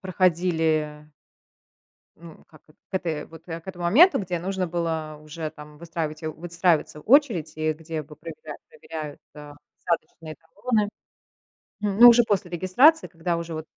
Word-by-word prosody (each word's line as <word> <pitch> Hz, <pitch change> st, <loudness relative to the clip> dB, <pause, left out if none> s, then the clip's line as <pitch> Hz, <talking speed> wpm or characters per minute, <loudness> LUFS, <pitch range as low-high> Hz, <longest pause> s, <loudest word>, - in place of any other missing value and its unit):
проходили 160 Hz, -5 st, 0 dB, 1.1 s
ну, 165 Hz, -1 st, -14 dB
как, 155 Hz, -2 st, -19 dB
э 155 Hz, -, -22 dB, 0.2 s
к -, -, -41 dB
этой 165 Hz, -5 st, -2 dB
вот 165 Hz, 0 st, -15 dB
к 165 Hz, +1 st, -8 dB
этому 175 Hz, -2 st, -5 dB
моменту, 315 Hz, -, +6 dB
где 180 Hz, -4 st, -3 dB
нужно 185 Hz, 0 st, -2 dB
было 160 Hz, -3 st, -3 dB
уже 155 Hz, +1 st, -6 dB
там 150 Hz, -1 st, -13 dB
выстраивать, 160 Hz, -2 st, -5 dB
у 155 Hz, -1 st, -3 dB
выстраивается 170 Hz, -2 st, 0 dB
очередь, 220 Hz, -, +3 dB
и 155 Hz, 0 st, 0 dB
где 160 Hz, 0 st, -6 dB
бы 150 Hz, +1 st, -14 dB
проверяли 470 Hz, -, -9 dB
проверяют, 160 Hz, -, -8 dB, 0.2 s
а, 150 Hz, -1 st, -11 dB, 0.3 s
посадочные 160 Hz, -2 st, -3 dB
талоны. 205 Hz, +7 st, -2 dB, 0.9 s
М, 205 Hz, 0 st, -1 dB
ну, 240 Hz, -, +12 dB
уже 240 Hz, 0 st, +7 dB
после 195 Hz, -5 st, -1 dB
регистрации, 215 Hz, -, +4 dB
когда 170 Hz, 0 st, -2 dB
уже 170 Hz, -1 st, -5 dB
вот 155 Hz, 0 st, -6 dB
165 Hz, 150 wpm, -24 LUFS, 155-185 Hz, 1.1 s, ну